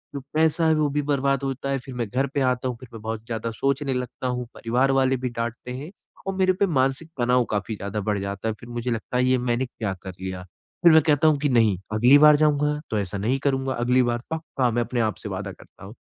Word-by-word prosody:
जो - - -2 0.2
पैसा 160 +1 +3
है, 160 - +4
वो 150 -1 +1
भी 145 +1 0
बर्बाद 140 -1 0
होता 135 0 -3
है 135 -1 0
फिर 130 0 -10
मैं 120 -3 -2
घर 135 +5 0
पे 140 - 0
आता 130 0 +1
हूँ 125 -2 -3
फिर 130 -2 -12
मैं 110 - -8
बहुत 110 0 -5
ज़्यादा 115 -1 -3
सोचने 135 +3 -1
लगता 125 0 -4
हूँ, 125 0 -2
परिवार 125 +4 +1
वाले 135 -1 +2
भी 125 0 -3
डाँटते 120 +1 -5
हैं 145 +8 -7 0.4
और 195 - -2
मेरे 185 -1 +3
पे 200 +2 +1
मानसिक 135 +1 0
तनाव 125 +1 +3
काफ़ी 105 +1 -2
ज़्यादा 100 +1 -4
बढ़ 105 0 -1
जाता 100 +2 -4
है 110 - 0
फिर 120 - -12
मुझे 120 +1 -3
लगता 115 +2 -3
है 125 - +3
ये 130 0 +3
मैंने 125 +1 0
क्या 110 -5 -4
कर 95 - -6
लिया। 95 -1 -5 0.4
फिर 170 - +8
मैं 160 0 +7
कहता 150 +1 +4
हूँ 150 -2 +4
कि 145 -1 +1
नहीं 110 -6 +3 0.2
अगली 125 +6 +6
बार 150 0 +7
जाऊँगा 150 0 +2
तो 110 - 0
ऐसा 100 0 -3
नहीं 120 +7 0
करूँगा, 135 -1 0
अगली 125 +1 +2
बार 120 0 0
पक्का 155 -6 -1
मैं 120 +1 +1
अपने 120 +1 -2
आप 110 -1 0
से - - -5
वादा - - -4
करता - - -15
हूँ। - - -10
125 Hz, 255 wpm, -24 LUFS, 115-140 Hz, 0.4 s, फिर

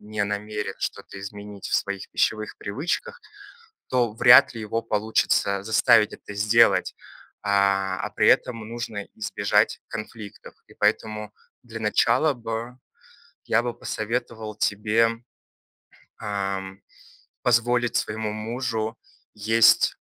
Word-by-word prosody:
не 105 0 -3
намерен 105 +1 -3
что-то 95 - -5
изменить 100 0 -8
в - - -2
своих 100 -1 -2
пищевых 110 -1 -1
привычках, 175 - -3 0.7
то 120 -4 +1
вряд 120 +3 +7
ли 115 - -7
его 115 +2 -2
получится 105 -2 +1
заставить 110 0 +4
это 105 - -10
сделать. 110 +3 +3 0.5
А, 100 -2 +1
а - - -3
при - - +1
этом 115 -3 +2
нужно 115 -3 -5
избежать 100 -2 0
конфликтов. 110 -1 -9
И - - -18
поэтому 105 -1 -1 0.3
для 115 -2 -8
начала 110 +8 +2
бы 115 +1 -5 0.7
я 115 - +2
бы 120 -1 -3
посоветовал 110 -1 -4
тебе, 110 +2 +2 1.1
ам, 95 -1 -4 0.6
позволить 120 0 +2
своему 105 0 -2
мужу 110 0 -3 0.4
есть, 110 +2 +4
110 Hz, 110 wpm, -24 LUFS, 105-115 Hz, 1.1 s, вряд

